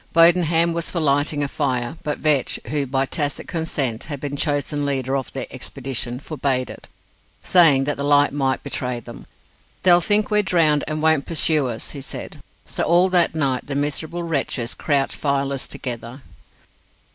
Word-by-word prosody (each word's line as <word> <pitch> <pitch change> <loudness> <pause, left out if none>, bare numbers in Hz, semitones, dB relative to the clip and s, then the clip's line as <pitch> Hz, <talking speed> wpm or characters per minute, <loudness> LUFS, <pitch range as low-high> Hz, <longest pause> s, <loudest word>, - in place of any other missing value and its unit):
Bodenham 170 0 +4
was 170 0 -2
for 175 - -2
lighting 145 0 +1
a - - 0
fire, 130 -2 -2
but 150 - -3
Vetch, 150 -4 +1
who, 145 -2 0
by 135 +1 +1
tacit 145 0 -2
consent, 140 -8 -2
had 145 -3 -5
been 145 0 -4
chosen 145 0 -1
leader 135 -2 -1
of 135 -2 -3
the 135 -2 -4
expedition, 130 -2 -5
forbade 140 -4 -2
it, - - -12 0.6
saying 160 -7 +5
that 145 +1 -2
the 140 - -3
light 145 0 +3
might 135 -2 -1
betray 125 -3 -3
them. 115 - -12 0.6
"They'll 175 -1 +6
think 210 +3 +1
we're 210 0 +4
drowned, 160 -6 +2
and 155 0 -3
won't 160 -3 +2
pursue 155 -4 +2
us," 115 -2 -6
he 140 - -7
said. 135 - -7 0.3
So - - -4
all 175 +2 +4
that 175 -3 +3
night 135 -5 0
the 140 - -4
miserable 150 +4 -1
wretches 135 -7 -2
crouched 140 -3 0
fireless 140 -1 -1
together. 125 +1 -6
145 Hz, 170 wpm, -21 LUFS, 135-160 Hz, 0.6 s, They'll